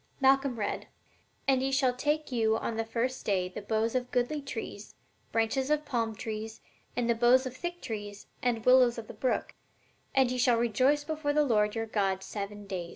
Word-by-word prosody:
Malcolm 270 -2 +3
read: 205 -2 -3 0.6
"'And 265 -1 +4
ye 270 +1 0
shall 265 -2 +3
take 295 +3 -1
you 220 -2 +2
on 230 - -3
the 225 - 0
first 235 +3 -2
day 185 -3 +1
the 185 +3 -7
boughs 220 +2 0
of 250 -1 -1
goodly 250 +5 0
trees, 225 -6 -7 0.4
branches 230 +5 +1
of 300 0 +1
palm 230 -5 -1
trees, 220 +1 -5 0.4
and 245 -1 +1
the 235 - +4
boughs 245 +3 +4
of 255 0 -5
thick 345 +4 -5
trees, 205 -4 -6 0.2
and 235 -3 0
willows 250 -2 +6
of 230 - -5
the - - -8
brook; 255 - -1 0.6
and 265 -2 +4
ye 255 - -2
shall 245 -1 +4
rejoice 255 +6 +2
before 305 -1 -2
the 300 0 +3
Lord 210 -4 +2
your 225 0 -1
God 195 -3 0
seven 205 0 -6
days.'" 180 -3 -4
240 Hz, 195 wpm, -30 LUFS, 220-265 Hz, 0.6 s, willows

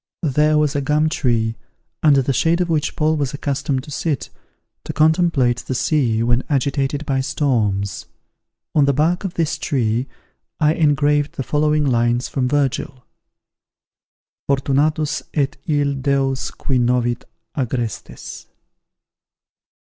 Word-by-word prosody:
There 150 +1 +3
was 150 -1 +1
a 145 - +1
gum 150 +3 +2
tree, 115 -6 0 0.4
under 140 -3 +5
the 135 - 0
shade 165 +7 +2
of 180 -1 0
which 155 -2 0
Paul 155 +1 +1
was 140 -2 -2
accustomed 140 -2 -2
to 150 - -11
sit, 150 -1 -2 0.5
to - - -5
contemplate 155 -6 +3
the 130 - -4
sea 120 -6 +1
when 120 +1 +2
agitated 140 +1 0
by 135 -1 0
storms. 105 -9 -1 0.7
On 145 -2 +4
the 140 - +2
bark 165 +6 +1
of 185 - -4
this 160 -1 -1
tree, 120 -4 0 0.5
I 155 -1 +3
engraved 145 -1 +2
the 135 - -3
following 150 +3 +1
lines 120 -1 +1
from 130 -2 -1
Virgil: 135 -2 -1 1.4
Fortunatus 145 +3 +1
et 140 -2 0
ille 145 -2 +1
deos 135 -1 0
qui 130 -3 -2
novit 120 0 +1 0.3
agrestes! 120 -5 -4
140 Hz, 130 wpm, -20 LUFS, 125-150 Hz, 1.4 s, under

